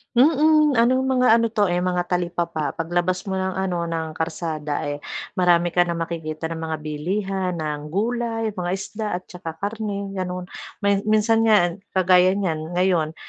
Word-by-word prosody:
Mm, 300 +2 +5
anong 255 +3 +3
mga 250 -3 +4
ano 230 - +2
'to, 210 -4 +1
eh, 175 - +1
mga 180 0 0
talipapa, 170 -4 -2
pag 165 +1 -4
labas 180 +1 0
mo 190 - -1
ng 190 0 -2
ano, 180 -3 -1
ng 165 -1 -3
kalsada, 155 -2 -3
eh, 145 0 -3 0.4
marami 175 -1 +4
ka 175 0 +3
na 170 - -1
makikita 165 -1 -4
ng 165 - -4
mga 160 -1 -3
bilihan 185 +5 -2
ng 150 -2 -3
gulay, 225 +4 -1
mga 180 -2 -3
isda 210 +3 -5
at 180 - -5
saka 170 -3 -7
karne 200 +1 -4
gano'n. 180 -1 -4 0.4
May 200 -1 +3
minsan 225 +1 +3
nga 180 -5 +5 0.2
kagaya 185 0 +5
niyan 165 -4 -2
ngayon, 175 -4 +1
180 Hz, 165 wpm, -23 LUFS, 165-210 Hz, 0.4 s, Mm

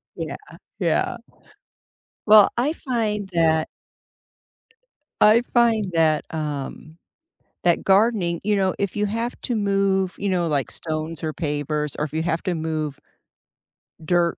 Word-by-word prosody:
Yeah, - - -5 0.4
yeah. - - 0 1.1
Well, 210 -1 +8
I 285 +6 +1
find 220 -9 -2
that 160 -2 +2 1.5
I 215 +3 +6
find 225 -5 +3
that, 160 -2 +2
um, 150 +1 -5 0.7
that 175 -1 +2
gardening, 195 -4 +2
you 210 0 +1
know, 190 -1 +1
if 200 -2 -2
you 210 0 0
have 230 +4 -3
to 240 - -2
move, 195 -3 +1
you 200 - -1
know, 175 -3 +1
like 145 -3 -1
stones 155 0 -4
or 155 -1 -2
pavers 150 -1 -2
or 150 - -1
if 150 - -9
you 160 - 0
have 165 -1 -1
to 185 - -1
move, 155 -3 -3 1.0
dirt 170 +1 +1
175 Hz, 135 wpm, -23 LUFS, 155-210 Hz, 1.5 s, Well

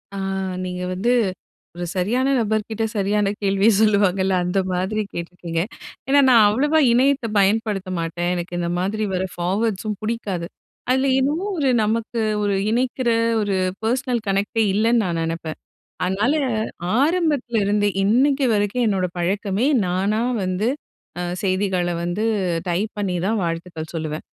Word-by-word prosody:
ஆ - - -4 0.5
நீங்க 180 0 -4
வந்து 220 +7 0 0.6
ஒரு 175 0 -4
சரியான 235 +9 +1
நபர் 215 -2 0
கிட்ட 225 0 -2
சரியான 205 0 +1
கேள்விய 200 +1 +3
சொல்லுவாங்கல்ல 195 -3 +3
அந்த 180 +2 0
மாதிரி 190 +4 -1
கேட்ருக்கீங்க. 170 -1 -4 0.5
ஏன்னா 280 +1 +5
நான் 230 -4 +7
அவ்வளவா 295 +8 +2
இணையத்த 260 0 +3
பயன்படுத்த 200 -1 +1
மாட்டேன். 170 +1 -2
எனக்கு 175 0 -5
இந்த 170 -1 -1
மாதிரி 210 +4 -1
வர்ற 185 0 0
பார்வேர்ட்ஸ்ஸும் 205 +3 -1
பிடிக்காது. 200 -6 -3 0.4
அதுல 260 +2 +2
ஏதோ 280 +3 +1 0.2
ஒரு 280 -4 +2
நமக்கு, 230 +2 -1 0.2
ஒரு 200 -1 +1 0.2
இணைக்கிற 250 +1 0 0.3
ஒரு 200 -2 0 0.3
பெர்சனல் 245 +1 0
கனெக்ட்டே 200 +3 +1
இல்லைன்னு 230 +3 +3
நான் 170 -2 -1
நெனப்பேன். 165 -1 -4 0.5
அதனால, 205 +9 +1 0.7
ஆரம்பத்துலருந்தே, 245 - +1
இன்னிக்கு 265 +7 +3
வரைக்கும் 205 +4 +1
என்னோட 190 -3 +1
பழக்கமே 200 +6 0 0.2
நானா 195 +5 0 0.2
வந்து, 185 +4 -1 0.5
அ - - -2 0.2
செய்திகள 185 -2 0
வந்து 175 +6 -2 0.4
டைப் 195 +5 0
பண்ணிதான் 195 +2 0
வாழ்த்துக்கள் 165 -1 -5
சொல்லுவேன். 155 -1 -4
205 Hz, 130 wpm, -22 LUFS, 180-230 Hz, 0.7 s, நான்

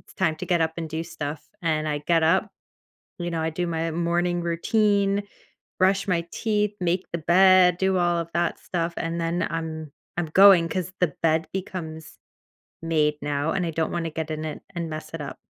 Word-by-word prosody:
it's - - -19
time 165 -4 +1
to - - -6
get 175 -2 +2
up 160 0 +1
and 165 -1 -4
do 160 +1 -2
stuff." 155 -3 -5 0.2
and 155 -2 0
I 150 -1 -1
get 165 -1 +3
up, 165 +4 +3 0.7
you 175 -1 -3
know, 165 -1 -2
I 160 - 0
do 175 +3 -2
my 165 -1 -1
morning 175 +1 0
routine, 200 +3 +1 0.5
brush 190 +2 +2
my 170 -2 +1
teeth, 210 -2 0
make 180 +1 0
the 170 - -1
bed, 180 +2 +5
do 190 -1 +2
all 175 -1 +2
of 170 0 -4
that 170 -1 0
stuff, 170 -1 -2
and 165 0 -2
then 170 +1 0
I'm 160 -2 -4 0.3
I'm 175 -1 -1
going 185 +1 +7
'cause 185 +1 -3
the 175 -5 +2
bed 160 0 +2
becomes 160 -5 -6 0.6
made 155 -2 +2
now, 145 +2 -1
and 185 - 0
I - - -1
don't 160 0 -1
wanna 170 -1 -2
get 160 0 -4
in 155 0 -3
it 155 - -5
and 170 -2 -3
mess 155 0 -7
it 165 - -4
up. 140 - -7
170 Hz, 200 wpm, -25 LUFS, 160-180 Hz, 0.7 s, going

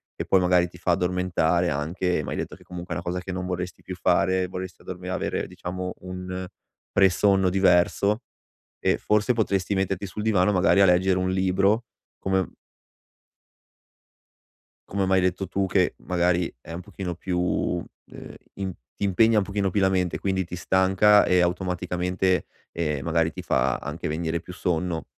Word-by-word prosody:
che - - -4
poi 95 - +4
magari 90 -1 +3
ti 90 - -15
fa 90 +1 0
addormentare 90 -1 +1
anche- 85 +4 -1
m'hai - - -4
detto - - -4
che - - -19
comunque 90 0 -7
è - - -3
una 85 - -5
cosa 90 +1 -2
che 95 +1 -6
non 90 0 -3
vorresti 90 0 -4
più 95 - -6
fare, 95 +1 +2
vorresti 90 -1 -7
dormi 90 0 -7
avere 95 - -2
diciamo 90 +1 -5
un 90 0 -6 0.5
pre-sonno 95 0 +4
diverso- 95 +3 +3 0.6
ehm, - - +3
forse 105 +3 +2
potresti 100 -4 0
metterti 95 0 -1
sul 100 +3 -6
divano 105 -3 +3
magari 100 +1 +4
a - - +7
leggere 90 +1 +3
un 95 0 0
libro 95 +4 +2 0.4
come 95 -1 0 2.4
come 100 -1 0
m'hai 95 0 +3
detto 95 +1 0
tu 95 +1 -1
che 90 -1 +2
magari 90 -1 0
è 75 - -12
un 85 - -5
pochino 90 0 -5
più, 90 -1 -1 0.3
ehm, - - -10 0.2
ti 95 -2 -4 0.3
ti 100 - 0
impegna 110 +4 +4
un 100 - +4
pochino 100 -1 -1
più 100 - 0
la 95 - +4
mente, 90 -2 0
quindi 95 -1 0
ti 90 +1 -7
stanca 95 +3 +4
e 90 - +3
automaticamente, 90 0 0 0.3
ehm, 75 -5 -2
magari 80 -1 +1
ti - - -7
fa 65 0 +1
anche 75 +5 -5
venire 80 +1 -2
più 90 - -10
sonno. 90 -2 -2
90 Hz, 165 wpm, -25 LUFS, 90-95 Hz, 2.4 s, a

